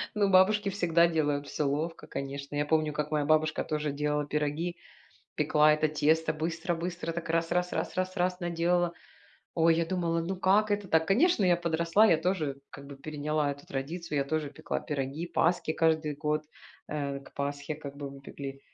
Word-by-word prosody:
Ну, 205 -2 +2
бабушки 200 +2 +4
всегда 170 -3 +3
делают 145 -3 0
всё 150 - -2
ловко, 155 +4 -2
конечно. 140 +1 -5
Я 145 - +1
помню, 155 0 +1
как 150 0 -3
моя 150 -1 +1
бабушка 155 +1 +2
тоже 150 -1 -2
делала 150 +1 -1
пироги, 150 +4 -2 0.6
пекла 150 0 +4
это 155 0 +2
тесто, 160 +1 +3
быстро-быстро, 170 +1 -3
так, 165 -1 -5
раз 165 0 +1
раз 180 0 0
раз - - -2
раз 185 +1 -1
раз 180 0 0
наделала. 175 0 +1 0.6
Ой, 165 0 +4
я 170 - +2
думала, 170 -2 0
ну 190 +3 -3
как 200 +4 +3
это 205 -1 -1
так? 160 -1 +3
Конечно, 240 - +4
я 175 -1 +5
подросла, 170 +4 +3
я 170 - +5
тоже, 160 -5 -1
как 140 - -11
бы, 140 0 -10
переняла 150 +1 -1
эту 145 0 -8
традицию, 150 +3 -4
я 140 - +1
тоже 155 +1 -1
пекла 140 - -4
пироги, 145 +3 -3
паски 165 -1 +2
каждый 160 -2 +1
год. 150 0 0 0.5
Э, 140 -2 -3
к 135 - -16
Пасхе, 145 +1 -3
как 140 -2 -9
бы, 140 -1 -6
мы 140 0 -11
пекли. 135 0 -8
160 Hz, 185 wpm, -29 LUFS, 145-175 Hz, 0.6 s, я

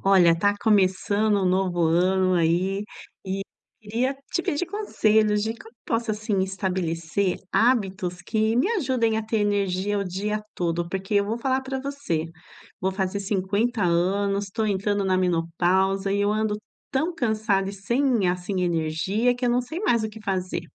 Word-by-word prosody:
Olha, 180 -4 +5
tá 205 +3 +3
começando 205 0 +2
um - - +1
novo 180 -1 +1
ano 185 +3 +3
aí, 180 +4 +1 0.4
e 195 0 -2 0.4
queria 235 +5 -1 0.2
te 345 - +1
pedir 295 +2 -1
conselhos, 220 - +1
de 220 +1 -2
como 230 0 -15
posso, 230 0 -1
assim, 210 -2 -1
estabelecer 185 -1 -1 0.2
hábitos 195 -6 +1
que 220 +3 0
me 250 - +3
ajudem 255 - +1
a - - -2
ter 220 +1 -1
energia 205 -1 0
o 200 - -1
dia 210 +3 -2
todo? 170 -1 -1
Porque 190 +3 -3
eu 200 0 +4
vou 225 - -1
falar 260 +2 0
pra 265 0 -4
você. 275 - -2 0.6
Vou 190 - +1
fazer 190 +1 -2
50 200 +4 0
anos, 195 +4 +1
tô 220 +2 -1
entrando 205 0 0
na 185 -1 +2
menopausa 185 +3 +1
e 200 +1 +1
eu 205 +1 +2
ando 215 -1 0 0.3
tão 310 +6 0
cansada 215 -8 0
e 195 - -5
sem, 235 +1 +1
assim, 180 +1 -1
energia, 175 +8 +1
que 250 - -3
eu 245 - +3
não 245 +1 +2
sei 315 +8 -6
mais 240 - +2
o 220 - -1
que 220 +1 -11
fazer. 185 -3 -2
200 Hz, 170 wpm, -25 LUFS, 185-225 Hz, 0.6 s, Olha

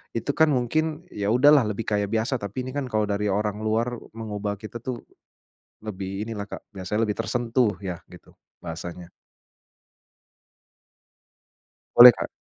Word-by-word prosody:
itu 115 +5 -1
kan 160 +2 +3
mungkin, 155 +6 -1
ya 100 -1 -3
udahlah 140 -1 +6
lebih 105 +1 -3
kayak 105 -1 0
biasa 115 +5 -1
tapi 100 +5 -5
ini 130 - -6
kan 140 -1 -3
kalau 110 -3 0
dari 105 0 -1
orang 105 +1 -1
luar 115 +2 -1 0.2
mengubah 105 -2 -4
kita 110 +3 -9
tuh 120 0 -6 0.8
lebih 100 0 -5
inilah, 105 -3 -4
Kak, 100 - -10
biasanya 95 +3 -2
lebih 105 - -1
tersentuh 115 -1 0
ya 95 -3 -4 0.2
gitu, - - -16 0.2
bahasanya. 85 +1 -7 2.9
Boleh, 125 +1 +12
Kak. - - -4
110 Hz, 140 wpm, -25 LUFS, 100-125 Hz, 2.9 s, Boleh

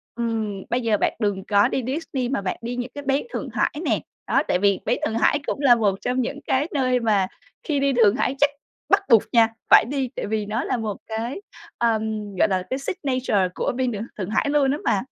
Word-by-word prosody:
ừm, 220 -4 -2
bây 245 +1 0
giờ 220 -3 +2
bạn - - +1
đừng 200 -3 -1
có 205 -1 +4
đi 260 - -2
Disney, 265 -3 -2
mà 275 - -1
bạn 190 - -3
đi 240 +1 -4
những 245 0 -4
cái 285 - -6
bến 275 +7 +1
Thượng - - -4
Hải - - +1
nè. - - +2 0.3
Đó, 275 - +3
tại 180 - +1
vì 200 -1 +3
bến - - +1
Thượng 220 - -2
Hải 290 - +3
cũng - - -2
là 255 -4 +6
một 205 -4 +1
trong 255 +1 0
những 280 +4 -3
cái 275 +4 +1
nơi 255 -3 +2
mà 210 -5 +2 0.4
khi 290 -4 0
đi 275 -1 +2
Thượng 225 -3 +4
Hải 265 0 0
chắc 290 0 +5 0.4
bắt - - +5
buộc 230 -3 +6
nha, 230 -2 +6 0.2
phải - - +8
đi, 265 -1 -2
tại - - -3
vì 215 0 -1
nó 215 +3 -2
là 255 - -1
một 215 -3 -3
cái, 230 - -4 0.4
ờm, 220 -3 -1
gọi 215 - +3
là, 185 -1 0
cái 260 - -2
signature 255 - 0
của - - -1
bên 255 -1 0
Thượng 210 -1 -4
Thượng 190 -1 -4
Hải 250 +6 +1
luôn 285 -2 +3
á 290 - 0
mà. 195 - +2
235 Hz, 240 wpm, -23 LUFS, 210-265 Hz, 0.4 s, phải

